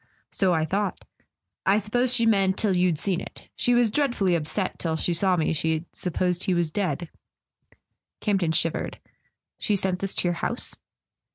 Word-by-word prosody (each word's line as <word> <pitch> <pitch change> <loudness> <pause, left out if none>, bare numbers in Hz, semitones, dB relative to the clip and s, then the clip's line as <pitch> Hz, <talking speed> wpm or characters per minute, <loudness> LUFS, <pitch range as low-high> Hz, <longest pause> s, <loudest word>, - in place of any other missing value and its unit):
"So 190 -2 +2
I 160 -2 +2
thought. 195 +4 -2 0.6
I 195 +2 +4
suppose 240 +4 +1
she 240 -2 +3
meant, 195 -4 +3
till 200 -4 +1
you'd 180 -3 +2
seen 180 +2 +1
it. - - -10
She 245 - +2
was 240 -3 +3
dreadfully 240 -9 +1
upset... 170 +4 -1
till 160 -2 -1
she 170 +2 0
saw 185 +2 +2
me 160 0 +1
she'd 160 +1 -1
supposed 180 0 -1
he 185 - +1
was 170 -2 0
dead." 180 -3 -2 1.1
Camp 205 -3 +1
ton 165 -2 +1
shivered. 160 0 0 0.6
"She 210 - +1
sent 190 -2 0
this 195 0 -3
to - - +2
your 175 - +1
house?" 240 - -2
185 Hz, 175 wpm, -25 LUFS, 170-205 Hz, 1.1 s, I